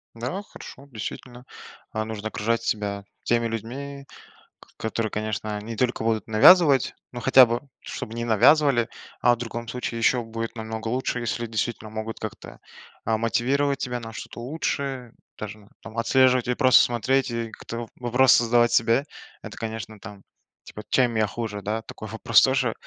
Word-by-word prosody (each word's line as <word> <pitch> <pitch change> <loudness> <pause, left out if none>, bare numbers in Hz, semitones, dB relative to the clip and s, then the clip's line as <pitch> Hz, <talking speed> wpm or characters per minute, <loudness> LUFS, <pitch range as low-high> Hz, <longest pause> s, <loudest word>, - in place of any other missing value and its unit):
Да, 125 - -4
хорошо. 140 -8 -12
Действительно, 120 +3 -7 0.5
а, 110 0 -2
нужно 110 -1 -5
окружать 115 +2 -1
себя 100 -2 -2 0.2
теми 115 0 +2
людьми, 135 +5 -6 0.7
которые, 110 -1 -2
конечно, 105 0 -3
не 115 +2 -6
только 125 -2 0
будут 110 -1 0
навязывать, 135 +5 +6 0.2
но 120 - -6
хотя 130 +1 +8
бы 120 +2 -2 0.2
чтобы 110 - -7
не 115 0 -3
навязывали, 120 +2 +4 0.3
а 120 - +5
в - - -16
другом 115 0 -6
случае 120 -1 -4
ещё 120 +1 +2
будет 115 +1 -5
намного 110 0 -5
лучше, 125 0 -1
если 120 0 -2
действительно 110 0 -3
могут 110 +1 -5
как-то, 110 - -8 0.5
а, 110 0 +1
мотивировать 135 +5 +1
тебя 125 -2 -3
на 115 0 -8
что-то 115 - -8
лучшее, 135 -2 -3 0.2
даже, 105 -1 -8
там, 110 +1 -10
отслеживать 130 +1 +3
и 125 - +1
просто 130 -2 +6
смотреть, 130 +3 +1
и 115 -1 -3
как-то 115 +1 -7
вопросы 125 0 +4
задавать 120 0 +3
себе. 115 +4 +3 0.4
Это, - - -8
конечно, 110 -1 -6
там, 100 -2 -11 0.4
типа: 105 - -10
"чем 125 -3 +2
я 110 -1 +2
хуже, 105 -2 -5
да?" 110 +3 -2
Такой 110 - -9
вопрос 110 - +4
тоже, 130 -3 +2
115 Hz, 160 wpm, -25 LUFS, 110-125 Hz, 0.7 s, хотя